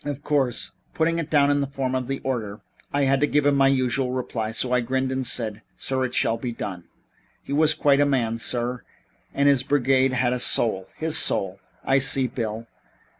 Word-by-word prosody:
Of 145 -1 -5
course, 135 -5 0 0.2
putting 165 +1 +1
it 165 - -5
in 145 -1 +3
the 140 - -1
form 135 -1 -3
of 130 -1 -2
an 135 - -3
order, 110 -5 -4 0.3
I 145 0 +1
had 135 0 +2
to 145 - +2
give 145 0 +1
him 140 -1 +3
the 135 - +5
usual 130 -1 0
reply, 120 -3 -3
so 115 +3 -1
I 125 - +3
grinned 130 +2 -1
and 130 0 -2
said: 115 -3 -1
'Sir, 130 -1 -1
it 125 - -5
shall 115 - +1
be 120 +1 -4
done.' 90 -6 -7 0.6
He 140 - -6
was 155 +1 +4
quite 140 -3 +3
a - - +4
man, 115 -5 0
sir, 120 +1 -1 0.5
and 140 0 +1
his 140 -3 +4
brigade 135 -1 +2
had 125 0 +1
a 125 - -2
soul 105 -6 +2
his 160 0 +3
soul 95 0 0
" - - -33
"I 135 - +5
see, 135 0 +3
Bill. 115 -3 -4
130 Hz, 210 wpm, -23 LUFS, 120-140 Hz, 0.6 s, the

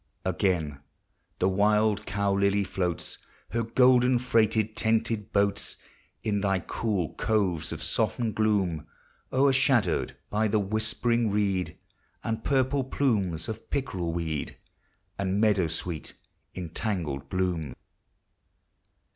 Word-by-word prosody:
Again 80 -7 0 0.6
the 90 - +2
wild 105 +2 +2
cow 100 -1 0
lily 100 +1 +2
floats 90 -3 -2 0.3
Her 115 - 0
golden 125 +2 +4
freighted, 110 -3 +2
tented 110 -2 0
boats 100 0 0 0.5
In 105 -2 0
thy 95 -1 +2
cool 95 -1 -2
coves 95 -7 +1
of - - -4
softened 115 -3 0
gloom, 100 -7 +1 0.4
O'ershadowed 130 - +3 0.2
by 110 +1 +2
the 110 - +2
whispering 110 +3 0
reed, 100 -3 0 0.5
And 110 0 -2
purple 135 0 +2
plumes 105 - 0
of 110 - -6
pickerel 95 -12 -2
weed, 80 -3 -3 0.6
And 100 0 0
meadow 105 -5 +3
sweet 80 0 -5 0.4
in 90 -3 -5
tangled 85 -8 -3
bloom. 90 -6 -1
100 Hz, 110 wpm, -28 LUFS, 90-115 Hz, 0.6 s, golden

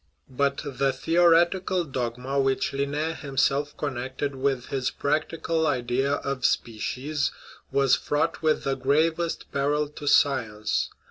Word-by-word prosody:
But 140 +2 0
the 135 -1 0
theoretical 175 +5 +3
dogma 130 -1 -3
which 135 0 +1
Linne 145 +3 -1
himself 140 +1 0
con 145 -2 -2
nected 130 +3 -3
with 135 -2 -1
his 130 -2 -1
practical 160 +2 -1
idea 130 +3 0
of 140 -2 -3
species 130 +6 -1 0.4
was 135 -1 +4
fraught 155 +3 -1
with 155 -1 +1
the 135 - 0
gravest 155 +5 0
peril 145 +2 +1
to 150 0 -9
science. 115 -8 +2
140 Hz, 125 wpm, -26 LUFS, 130-155 Hz, 0.4 s, was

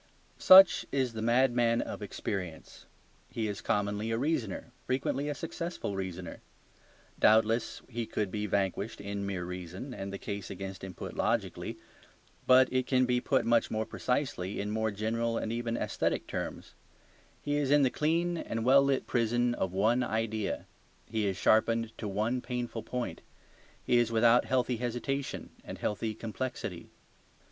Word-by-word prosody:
Such 190 0 +9
is 130 -4 0
the 110 - -4
madman 120 0 +3
of - - -4
experience; 90 -5 -5 0.4
he 110 -2 -2
is 100 -1 -4
commonly 105 +2 -1
a 115 - 0
reasoner, 125 - -2 0.2
frequently 135 +2 -1
a 145 - -2
successful 165 - -4
reasoner. 95 -2 -5 0.8
Doubtless 110 +1 +3
he 120 -2 -4
could 105 -3 -2
be 105 0 -2
vanquished 100 +2 -1
in 100 0 -4
mere 95 -3 -3
reason, 90 +8 -6
and 100 -3 -5
the 100 - -4
case 100 -1 -5
against 95 -1 -7
him 95 -2 -7
put - - -7
logically. - - -1 0.7
But 130 0 +7
it 130 -1 +1
can 130 -1 +3
be 125 0 +1
put 135 0 +1
much 115 0 +3
more 110 0 -1
precisely 125 -8 -2
in 105 +1 -2
more 110 +1 0
general 115 +3 -1
and 110 - -2
even 115 0 -2
aesthetic - - -1
terms. - - -5 0.7
He 145 0 -1
is 145 -2 0
in 145 0 +5
the 130 - +3
clean 170 +3 +1
and 115 0 -3
well 135 +2 +7
lit 140 -1 +1
prison 120 +1 +1
of 95 -6 -2
one 110 +6 +2
idea: 110 -2 -2 0.4
he 110 -2 -1
is 95 -1 -1
sharpened 115 +1 +2
to 110 - -3
one 110 +5 -1
painful 120 -2 -4
point. 120 -10 -4 0.6
He 120 - +3
is 120 -1 +1
without 115 +1 +5
healthy 125 -1 +1
hesitation 125 +3 -3
and - - -7
healthy 110 +1 -2
complexity. 110 -5 -5
115 Hz, 155 wpm, -30 LUFS, 100-125 Hz, 0.8 s, Such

